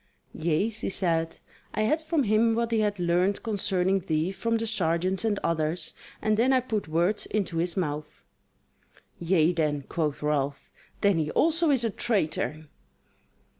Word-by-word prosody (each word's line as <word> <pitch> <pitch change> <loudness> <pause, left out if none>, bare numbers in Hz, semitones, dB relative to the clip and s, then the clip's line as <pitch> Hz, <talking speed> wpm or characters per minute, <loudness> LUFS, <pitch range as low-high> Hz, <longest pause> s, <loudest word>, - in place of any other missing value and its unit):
"Yea," 170 +7 0
she 220 - -3
said, 165 -4 0 0.4
"I - - 0
had 305 +8 +1
from 315 -2 0
him 225 +1 +3
what 235 0 -1
he 225 - +2
had 205 -2 0
learned 180 +3 +1
concerning 195 -3 +1
thee 165 -1 -1
from 230 +4 -1
the 225 - -2
sergeants 185 -3 0
and 215 -3 0
others, 160 +1 -1 0.3
and 215 -1 +2
then 250 +4 +3
I 260 - +5
put 220 -7 -3
words 170 +6 0
into 195 -5 -2
his 170 +2 -1
mouth." 150 -4 -4 0.9
"Yea 170 -1 +3
then," 150 -4 0
quoth 150 -3 -2
Ralph, 145 -2 -1 0.3
"then 200 -4 +3
he 155 -1 -1
also 330 - +2
is 265 -4 +3
a 225 - 0
traitor!" 160 -8 -1
190 Hz, 160 wpm, -27 LUFS, 165-220 Hz, 0.9 s, I